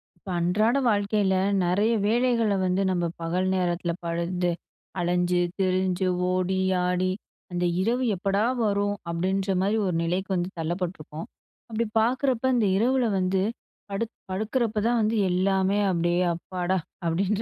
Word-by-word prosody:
இப்ப 180 +2 -13
அன்றாட 215 +9 +2
வாழ்க்கையில 205 -2 +1 0.3
நெறைய 200 +6 +2 0.2
வேலைகள்ல 230 -2 +2
வந்து 185 +1 +1
நம்ம 175 -2 0 0.2
பகல் 180 +3 0
நேரத்தில 175 -1 0
பண்ணி 175 +1 -1 0.5
அலஞ்சு, 175 0 +1 0.2
திரிஞ்சு, 185 0 +1 0.2
ஓடி, 185 +1 0 0.3
ஆடி 180 +1 +1 0.4
அந்த 175 0 -1 0.2
"இரவு 240 +6 +1
எப்படா 195 +3 0 0.2
வரும்" 205 0 +1
அப்படின்ற 190 +3 0
மாரி 200 +3 +1
ஒரு 180 - -1
நிலைக்கு 180 +4 -1
வந்து 175 0 -1
தள்ளப்பட்டுருப்போம். 165 -2 -4 0.4
அப்படி 230 +1 -1
பார்க்குறப்ப 255 +2 +1
அந்த 230 -3 +2
இரவுல 250 +4 +2
வந்து 185 +1 +1 0.5
படுக் 225 +3 -3 0.2
படுக்குறப்ப 220 +3 -1
தான் 240 0 +2
வந்து 215 +1 +1
எல்லாமே 190 +2 +2
அப்படியே 175 0 +1
அப்பாடா 180 +2 -2 0.3
அப்படின்ற 195 +5 0
190 Hz, 130 wpm, -26 LUFS, 180-210 Hz, 0.5 s, அன்றாட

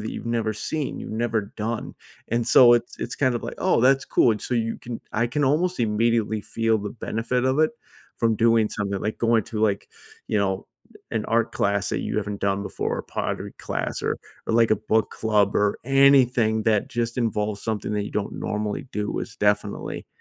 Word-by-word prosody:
that 110 - -4
you've - - -6
never 115 -2 0
seen, 145 +6 -3
you've - - -7
never 110 0 0 0.2
done. 110 +1 -3 0.3
And 115 +1 0
so 120 -1 +8
it's 120 0 -2
it's - - -4
kind 130 -3 +2
of 120 - -3
like, - - -5
"Oh, - - +2
that's 135 +2 +4
cool." 120 - +3
And 105 - -1
so - - -4
you 115 -1 0
can 120 -1 -7
I 115 +2 +1
can 145 +5 -1
almost 160 +3 +1
immediately 110 0 +1
feel 115 -1 0
the 105 0 -5
benefit 120 +2 -2
of 130 +3 +1
it, 155 - +4 0.5
from 115 -2 +2
doing 115 -1 +4
something, 100 -2 -3
like 105 - -3
going 115 -2 +3
to, 110 -2 -5
like, 100 -2 +1 0.4
you 105 - +1
know, 95 -2 -1 0.4
an 110 -1 -1
art 115 0 +1
class 100 0 0
that - - -1
you - - -3
haven't 105 -1 -3
done 100 0 0
before, - - -3
a - - -4
pottery - - -4
class, - - -3
or - - 0 0.3
or, - - -1
like, 115 -1 +4
a 110 - +4
book 110 +1 0
club 105 -2 +1
or 105 0 +2
anything 125 -5 +4
that 105 -2 +1
just 120 +1 -2
involves 105 -3 -1
something 110 -1 -2
that 105 -1 -1
you - - -7
don't 105 - -2
normally 105 +4 -3
do 105 0 -2
is 110 - -6
definitely 105 0 -1
110 Hz, 205 wpm, -24 LUFS, 105-120 Hz, 0.5 s, so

